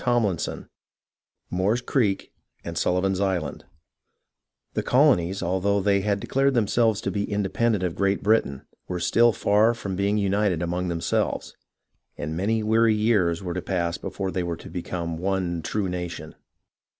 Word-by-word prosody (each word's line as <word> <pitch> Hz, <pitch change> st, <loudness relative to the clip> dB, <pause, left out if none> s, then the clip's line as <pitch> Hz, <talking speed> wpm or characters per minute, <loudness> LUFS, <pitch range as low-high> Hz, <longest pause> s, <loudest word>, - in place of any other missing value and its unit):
CHAPTER 120 Hz, -7 st, +2 dB
XI -, -, -4 dB, 0.9 s
moore's 95 Hz, +6 st, +1 dB
creek 115 Hz, -6 st, 0 dB, 0.3 s
and 85 Hz, -, -6 dB
Sullivan's 90 Hz, +2 st, +1 dB
island 90 Hz, -7 st, -2 dB, 1.1 s
The -, -, 0 dB
colonies, 100 Hz, -, +3 dB
although 95 Hz, +3 st, +1 dB
they 100 Hz, 0 st, +2 dB
had 100 Hz, 0 st, 0 dB
declared 135 Hz, +5 st, +1 dB
themselves 110 Hz, -1 st, +2 dB
to -, -, -2 dB
be 100 Hz, 0 st, -2 dB
independent 105 Hz, +1 st, 0 dB
of 90 Hz, -2 st, -1 dB
Great 100 Hz, +2 st, 0 dB
Britain, 100 Hz, -10 st, +1 dB, 0.2 s
were 90 Hz, -1 st, -3 dB
still 115 Hz, +7 st, +4 dB
far 110 Hz, +2 st, +3 dB
from 100 Hz, -5 st, -5 dB
being 100 Hz, +2 st, +1 dB
united 100 Hz, -3 st, +1 dB
among 90 Hz, +1 st, -2 dB
themselves, 85 Hz, -1 st, -1 dB, 0.6 s
and 80 Hz, +2 st, -4 dB
many 110 Hz, +5 st, 0 dB
weary 110 Hz, 0 st, +3 dB
years 100 Hz, -6 st, +2 dB
were 90 Hz, -2 st, -3 dB
to 90 Hz, -, -3 dB
pass 85 Hz, -3 st, -2 dB
before 95 Hz, 0 st, -4 dB
they 95 Hz, -, -1 dB
were 85 Hz, -1 st, -3 dB
to -, -, -11 dB
become 85 Hz, -2 st, -4 dB
one 90 Hz, -2 st, -1 dB
true 105 Hz, +3 st, -2 dB
nation. 90 Hz, -3 st, -5 dB
95 Hz, 150 wpm, -25 LUFS, 90-105 Hz, 1.1 s, still